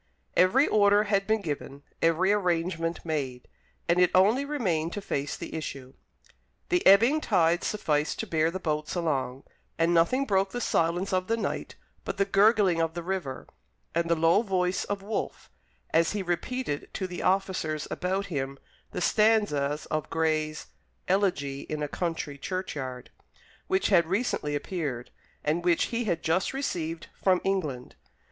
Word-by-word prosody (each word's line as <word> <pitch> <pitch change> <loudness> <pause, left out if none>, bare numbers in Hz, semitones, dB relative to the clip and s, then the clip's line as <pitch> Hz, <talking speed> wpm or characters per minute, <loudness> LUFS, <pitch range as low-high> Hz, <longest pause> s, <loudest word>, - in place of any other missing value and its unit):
Every 240 +11 +5
order 205 0 +4
had 200 -2 0
been 220 0 +2
given, 140 -4 -5 0.2
every 165 +4 +3
arrangement 170 -4 -1
made, 135 -6 -3 0.4
and 170 +1 +3
it 180 -1 +5
only 210 +9 +4
remained 180 - -1
to - - -3
face 145 -7 -3
the - - -7
issue. 135 -5 -6 0.8
The 355 0 +2
ebbing 230 +11 +6
tide 175 - +2
sufficed 150 -7 0
to - - -3
bear 160 -4 +1
the 185 +3 -4
boats 155 -2 -2
along, 135 -6 -1 0.3
and 165 +1 +2
nothing 215 +12 +3
broke 195 -4 +2
the 245 - -2
silence 175 -2 0
of 185 0 0
the 230 - +1
night - - -3 0.3
but - - -4
the 200 - +3
gurgling 195 -3 +4
of 165 0 -1
the 170 - -4
river, 175 -8 -4 0.5
and 170 0 0
the 170 - +4
low 165 +4 +4
voice 185 -4 0
of 200 -1 -4
Wolfe, 215 +2 -4 0.4
as 165 +3 +3
he 205 -2 -2
repeated 175 - -3
to 190 - -2
the 180 -1 -5
officers 180 -5 0
about 190 +2 -1
him 140 -6 -3 0.4
the - - -3
stanzas 180 -10 +2
of 155 -1 -2
Gray's 155 -1 -1 0.4
"Elegy 175 -8 0
in 150 -1 -2
a - - -1
Country 160 -3 -3
Churchyard," 140 -9 -5 0.6
which 190 - +1
had 170 -5 +4
recently 185 -7 -1
appeared, 145 -6 -4 0.3
and 160 +3 0
which 175 -1 +3
he 235 0 0
had 170 -5 -1
just 175 +8 +1
received 165 - -3 0.2
from 185 -2 +4
England. 155 -11 -2
175 Hz, 155 wpm, -28 LUFS, 155-195 Hz, 0.8 s, ebbing